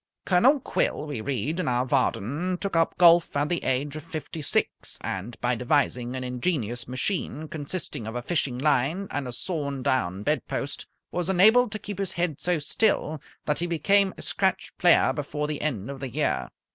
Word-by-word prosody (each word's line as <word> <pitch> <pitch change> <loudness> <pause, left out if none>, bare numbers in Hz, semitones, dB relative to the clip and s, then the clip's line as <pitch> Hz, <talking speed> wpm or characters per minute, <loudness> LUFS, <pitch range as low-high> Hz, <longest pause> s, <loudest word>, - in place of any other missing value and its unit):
Colonel 250 +11 +5
Quill, 155 - -1
we 145 -7 -4
read 140 - -2
in 185 - -1
our 125 0 +1
Vardon, 140 - 0
took 195 -2 -3
up 165 0 +2
golf 170 -3 +6
at 145 +1 +1
the 175 -2 -1
age 140 +3 0
of 155 - -6
fifty 160 -1 -6
six, - - -1
and 100 +5 -5
by 125 0 +2
devising 125 0 0
an 130 - -3
ingenious 125 - -2
machine 150 +3 -2
consisting 150 -6 -5
of 110 - -5
a 120 - -3
fishing 140 -5 -1
line 150 +7 +1
and 145 -2 -2
a - - -4
sawn 140 -2 -3
down 100 -7 0
bedpost 145 0 -2 0.2
was 180 0 -2
enabled 215 +6 +5
to - - -2
keep 205 -2 -7
his 195 -2 -2
head 170 -4 -1
so 180 -1 +1
still 155 -1 0 0.2
that 150 - 0
he 175 - 0
became 190 +4 +3
a - - -7
scratch 190 -1 -1
player 175 -2 +5
before 150 0 -3
the 150 -1 -3
end 120 -9 -2
of 140 - -8
the 135 -1 -4
year. 65 - -1
150 Hz, 185 wpm, -26 LUFS, 125-175 Hz, 0.2 s, golf